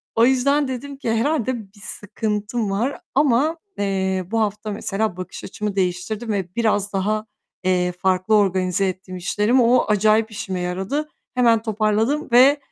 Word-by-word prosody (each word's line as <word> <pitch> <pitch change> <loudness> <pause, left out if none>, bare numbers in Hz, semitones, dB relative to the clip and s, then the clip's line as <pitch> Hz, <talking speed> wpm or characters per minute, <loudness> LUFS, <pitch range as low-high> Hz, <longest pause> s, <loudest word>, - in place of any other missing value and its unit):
O 230 - +5
yüzden 275 +3 +3
dedim 270 +2 -6
ki 235 - -2
"Herhâlde 250 +1 0
bir 200 0 -18
sıkıntım 210 +1 -3
var." 235 +8 -1
ama, 290 +4 +3 0.2
eee, 190 -2 -1
bu 225 -1 +1
hafta 210 0 -2
mesela 200 -1 -2
bakış 185 - -7
açımı 210 +1 -4
değiştirdim 195 +5 -2
ve 185 -3 -3
biraz 205 -3 +1
daha, 215 +3 0 0.4
eee, 180 -1 +1
farklı 185 +3 +1
organize 190 -1 +2
ettim 185 0 -5
işlerimi, 210 +8 +2
o 245 +2 +4
acayip 215 +1 +3
işime 195 -4 -4
yaradı. 190 +13 -2 0.3
Hemen 235 -3 +4
toparladım 220 +6 0
ve, 265 +4 +7
215 Hz, 145 wpm, -22 LUFS, 190-240 Hz, 0.4 s, ve